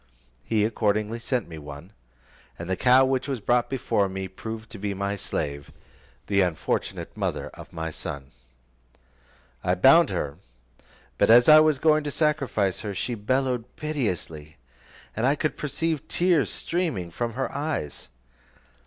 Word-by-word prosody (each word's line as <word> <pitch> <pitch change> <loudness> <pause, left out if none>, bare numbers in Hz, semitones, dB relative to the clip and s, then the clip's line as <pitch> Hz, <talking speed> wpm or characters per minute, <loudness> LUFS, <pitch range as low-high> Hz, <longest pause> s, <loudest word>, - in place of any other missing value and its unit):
He 110 -2 +1
accordingly 110 0 0
sent 120 -1 -2
me 80 -2 -9
one, 75 +6 -10 0.6
and 85 - -7
the 95 - 0
cow 125 +5 +5
which 130 0 0
was 135 -3 -2
brought 120 +4 +1
me 95 -7 -1
proved 110 +4 -8
to 105 - -8
be 100 0 -3
my 100 +1 -2
slave, 70 -7 -4 0.5
the 100 -1 +2
unfortunate 90 -4 -2
mother - - -2
of - - -13
my 80 0 -4
son. 70 -3 -7 1.3
I 90 - +2
bound 135 - +6
her, 75 -4 -3 0.8
but - - +4
as 120 +2 +7
I 155 0 +10
was 155 -2 +4
going 155 +2 +3
to - - -1
sacrifice 140 - 0
her, 100 -2 -5
she 120 - -2
bellowed 125 +2 -1
piteously, 90 - -4 0.6
and 115 +4 +1
I 140 - +3
could 155 +1 -1
perceive 155 +1 -2
tears 175 -5 +2
streaming 160 - -2
from 115 +6 -3
her 135 +3 -3
eyes. 75 - -3
110 Hz, 145 wpm, -25 LUFS, 95-135 Hz, 1.3 s, I